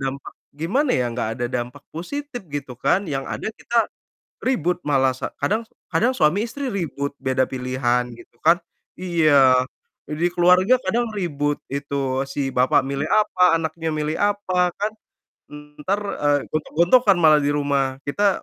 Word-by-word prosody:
dampak 135 0 -5 0.3
gimana 250 - +1
ya, 125 - +1
nggak 115 -2 -2
ada 120 - -2
dampak 125 +3 -6
positif 265 - -5
gitu 145 -3 -5
kan, 195 - +3
yang 135 0 -2
ada 220 - -4
kita 235 0 0 0.6
ribut 180 - +1
malah 135 -2 +3
sa 130 - -5 0.2
kadang 220 +2 0 0.2
kadang 255 +3 +2
suami 155 -1 +3
istri 260 +2 -4
ribut 150 -7 -3
beda 130 -1 +1
pilihan 125 -1 0
gitu 120 0 -17
kan 165 +2 +5 0.4
iya, 150 -8 +4 0.5
di 155 +4 0
keluarga 180 +7 +4
kadang 235 -2 -1
ribut 145 -7 -2
itu 140 -1 -2
si 135 0 -3
bapak 125 +1 +4
milih 140 +3 -2
apa, 180 -5 +4
anaknya 160 0 -3
milih 155 0 -2
apa, 185 -3 0
kan, 210 +1 0 0.6
entar, 150 +7 -4 0.2
eee, 145 0 +3 0.2
gontok-gontokan 175 +7 +3
malah 155 -3 +6
di 145 - +1
rumah. 140 -2 0
Kita 200 +7 +1
155 Hz, 145 wpm, -22 LUFS, 135-195 Hz, 0.6 s, malah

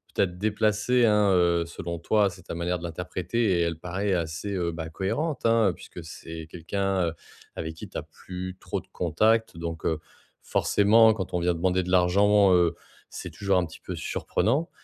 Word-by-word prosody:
peut-être 90 -2 +1
déplacée, 110 +4 +2
hein, 105 -2 +4
heu, 85 -2 +3
selon 85 0 -6
toi. 105 +4 +3
C'est 90 -1 -13
ta - - -6
manière 85 +1 -1
de - - -11
l'interpréter 90 +4 -1
et - - +3
elle 85 -1 -1
paraît 95 +4 -2
assez, 85 +4 -2
heu, 85 -3 -1
bah, 80 -1 -5
cohérente, 115 - -2
hein, 115 -4 +4
puisque 90 - -10
c'est 80 0 -8
quelqu'un, 95 +2 -1
heu, 80 - -2 0.4
avec 80 0 -4
qui - - -9
tu - - -6
as - - -3
plus 95 0 -8
trop - - -3
de - - -17
contacts 110 +4 +1
donc, 85 0 -5
heu, 80 -1 +1 0.4
forcément, 110 +2 +4
quand 95 -4 -5
on 90 - +1
vient 90 0 +2
demander 90 +2 +1
de 90 - -5
l'argent, 100 +2 +5
heu, 85 -2 +3 0.3
c'est - - -7
toujours 100 -2 +1
un 90 - +2
petit 80 - -12
peu - - -6
surprenant. 135 - -1
90 Hz, 190 wpm, -26 LUFS, 85-105 Hz, 0.4 s, l'argent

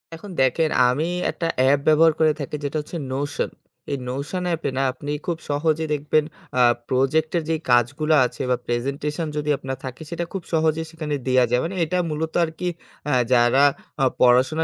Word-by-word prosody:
এখন 180 +5 -11
দেখেন, 155 +5 +2 0.2
আমি 150 +7 0 0.2
একটা 165 - -3
অ্যাপ 135 +2 +4
ব্যবহার 155 +1 +6
করে 160 -1 +5
থাকি, 145 +1 -4
যেটা 145 +2 -2
হচ্ছে 160 +3 -7
নোশন। 140 +2 -2 0.4
এই 140 - 0
নোশন 140 +8 -3
অ্যাপে 165 -4 -1
না, - - +2
আপনি 145 +2 -6
খুব 170 -2 -1
সহজে 155 +2 +1
দেখবেন, 150 +1 +1 0.3
আ - - +4 0.3
প্রজেক্টের 155 +6 +1
যে 160 - +2 0.2
কাজগুলো 140 +6 +2
আছে - - -5
বা 125 - +3
প্রেজেন্টেশন 140 +6 -2
যদি 150 0 -2
আপনার 130 0 -5
থাকে, 130 +4 -7
সেটা 170 0 -3
খুব 190 - -4
সহজেই 160 0 +1
সেখানে 155 -3 -3
দেয়া 130 -1 +4
যায়। 125 +1 +2
মানে 190 - -4
এটা 180 +4 -1
মূলত 160 +1 -3
আরকি 165 +2 -3 0.4
আ - - +2 0.2
যারা 120 +3 +5 0.4
আ - - +5
পড়াশোনা 130 +6 +4
150 Hz, 175 wpm, -23 LUFS, 130-160 Hz, 0.4 s, ব্যবহার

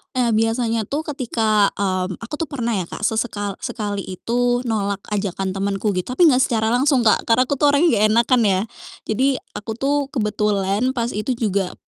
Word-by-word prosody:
Ah, 245 -2 +2
biasanya 225 0 0
tuh 295 +3 -2
ketika 225 -6 +1
mmm, 185 -2 -1
aku 230 - -9
tuh 325 - -2
pernah 240 -5 -3
ya, 180 - -3
Kak, - - -8
sesekal 210 -3 -2
sekali 205 -3 -4
itu 245 +6 0
nolak 200 -4 -2
ajakan 195 -2 -2
temenku 195 +2 -1
gitu, 185 +6 -3
tapi 355 - +4
enggak 255 -1 +3
secara 220 -2 0
langsung, 260 0 +3
Kak, 215 - +3
karena 230 +2 +4
aku 260 - -2
tuh 295 - +4
orangnya 330 +4 +4
enggak 210 - +4
enakan 235 +1 +3
ya. 190 -1 +2 0.5
Jadi 255 +6 +1 0.3
aku 215 - -6
tuh 280 +3 0
kebetulan 210 0 0
pas 235 -1 -1
itu 215 +5 -2
juga 200 -5 -1
225 Hz, 180 wpm, -21 LUFS, 200-245 Hz, 0.5 s, tapi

